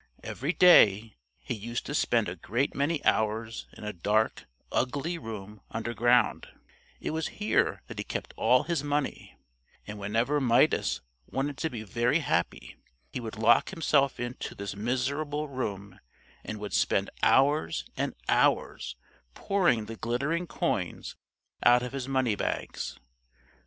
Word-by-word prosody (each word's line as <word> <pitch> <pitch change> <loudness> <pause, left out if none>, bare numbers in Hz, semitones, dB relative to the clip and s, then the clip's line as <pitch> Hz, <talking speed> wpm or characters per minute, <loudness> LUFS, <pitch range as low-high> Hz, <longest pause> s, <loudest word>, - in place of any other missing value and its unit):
Every 140 +6 -2
day 110 - +6 0.2
he - - -5
used 120 +2 -4
to 145 - -4
spend 120 -6 +2
a 90 - -4
great 115 - -1
many 145 +2 -1
hours 110 +1 0
in - - -10
a 105 0 -4
dark, 105 +5 0 0.3
ugly 145 +7 -1
room 105 -4 -8
underground: 120 +1 +1 0.5
it - - -3
was 160 0 -1
here 210 0 +1
that - - -8
he - - -1
kept - - -5
all - - +4
his 170 -5 -1
money, 145 -1 -2 0.5
and 105 0 -7
whenever 115 +9 0
Midas 120 -2 +3 0.3
wanted 135 +3 -2
to 160 - 0
be 115 -6 -6
very 120 +7 +1
happy 85 - -2 0.4
he - - -2
would 115 -2 -6
lock 115 +2 +4
himself 145 -6 +1
into 120 0 -5
this 100 0 -5
miserable 140 +7 -1
room 105 -8 -5 0.4
and 110 - -5
would 105 0 -6
spend - - +1
hours 135 - +3
and - - -2
hours 60 - +1 0.4
pouring 175 - +2
the 115 +1 -8
glittering 140 +11 -1
coins - - -2 0.5
out 120 0 +5
of 125 - -4
his 135 -2 -4
money 130 -4 +1
bags. - - -3
120 Hz, 140 wpm, -28 LUFS, 110-145 Hz, 0.5 s, day